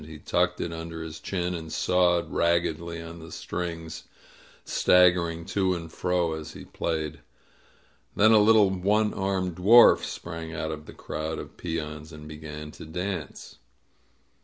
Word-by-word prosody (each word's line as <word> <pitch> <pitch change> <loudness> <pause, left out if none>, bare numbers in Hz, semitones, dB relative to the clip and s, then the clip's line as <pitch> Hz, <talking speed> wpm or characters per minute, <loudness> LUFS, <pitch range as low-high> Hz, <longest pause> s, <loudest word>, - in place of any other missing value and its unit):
He 80 0 -10
tucked - - 0
it 85 - -3
under 80 0 -6
his 80 0 -8
chin 90 -2 -2
and 80 -2 -6
sawed 90 -2 +2
raggedly 85 0 0
on 85 +1 -9
the 80 0 -11
strings, 85 -2 -5 0.6
stag 90 -1 +5
gering 85 -2 -3
to 95 -2 +1
and 80 -2 -8
fro 90 -2 0
as 80 0 -7
he - - -10
played. 80 -2 -3 1.0
Then 110 +2 +5
a 110 - +7
little 105 -2 +5
one 105 +3 +1
armed 95 -2 -1
dwarf 115 +7 +7
sprang 80 -1 -6
out 80 -2 -3
of 75 -1 -8
the - - -10
crowd 80 +1 -4
of - - -8
peons 80 -2 -5
and 75 -1 -10
be 75 0 -8
gan 75 0 -8
to - - -11
dance. 90 +1 -5
85 Hz, 160 wpm, -27 LUFS, 80-90 Hz, 1.0 s, a